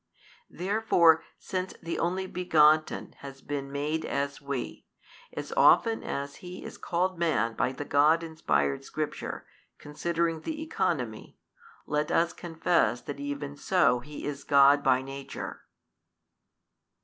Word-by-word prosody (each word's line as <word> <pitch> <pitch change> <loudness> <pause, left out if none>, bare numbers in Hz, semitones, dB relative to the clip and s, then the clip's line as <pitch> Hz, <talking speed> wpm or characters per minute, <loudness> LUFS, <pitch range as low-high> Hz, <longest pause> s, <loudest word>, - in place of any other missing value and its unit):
Therefore 175 -4 +3
since 185 0 -4
the 165 - -4
Only 185 +3 -1
Begotten 155 -4 +2
has 135 -1 -10
been 140 -1 -4
made 150 +3 -2
as 140 +1 -2
we, 140 -3 -5 0.5
as - - -6
often 230 - +5
as 140 0 -5
He 180 0 -9
is - - -9
called 180 +1 -1
Man 115 -10 +1
by 125 - 0
the 140 +2 -6
God 150 +4 +4
inspired 70 - 0
Scripture, - - -5 0.3
considering 165 +2 -2
the 315 - -4
economy, 320 - -2 0.5
let 150 0 -1
us 170 0 +2
confess 170 0 0
that 145 -2 -7
even 145 0 -5
so 145 -6 +2
is 145 0 -6
He - - -19
God 140 0 +6
by 130 -1 +3
Nature. 135 0 -7
150 Hz, 125 wpm, -28 LUFS, 140-170 Hz, 0.5 s, God